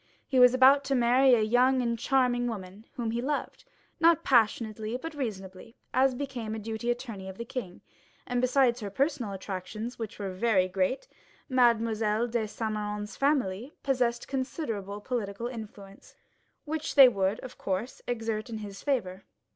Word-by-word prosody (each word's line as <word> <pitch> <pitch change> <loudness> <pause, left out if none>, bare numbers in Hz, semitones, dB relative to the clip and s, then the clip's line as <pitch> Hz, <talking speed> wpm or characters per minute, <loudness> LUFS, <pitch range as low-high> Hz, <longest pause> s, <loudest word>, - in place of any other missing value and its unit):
He 265 - +2
was 250 0 +7
about 270 +2 +6
to 275 0 +1
marry 250 +1 +5
a 225 - +1
young 250 +4 +3
and 235 -2 0
charming 245 -1 +2
woman, 200 -1 -7
whom 235 -5 -3
he 235 +1 -2
loved, 290 +3 -3 0.3
not 330 -1 +4
passionately, 220 -2 +1
but 325 +5 -7
reasonably, 210 -5 -6 0.2
as 260 0 +3
became 245 -5 -4
a - - -4
deputy 220 +2 -4
attorney 230 -6 -4
of 190 - -9
the 235 - -5
king; 230 -8 -6 0.4
and 245 0 -1
besides 255 -1 +3
her 205 -3 -5
personal 265 0 -1
attractions, 195 +5 -6
which 225 -1 -6
were 200 -2 -4
very 190 -2 +2
great, 190 +8 -1 0.4
Mademoiselle 230 -3 +2
de 235 -2 -1
Saint 220 +1 -3
Méran's 210 0 -4
family 265 -4 0
possessed 245 -3 0
considerable 225 - -4
political 220 -2 -3
influence, 210 -5 -9 0.5
which 310 0 -3
they 275 -3 +10
would, 200 -3 0
of 255 - -10
course, 195 +6 -3
exert 225 -1 -2
in 225 - -4
his 205 -2 -8
favor. 195 -10 -2
235 Hz, 160 wpm, -28 LUFS, 210-255 Hz, 0.5 s, they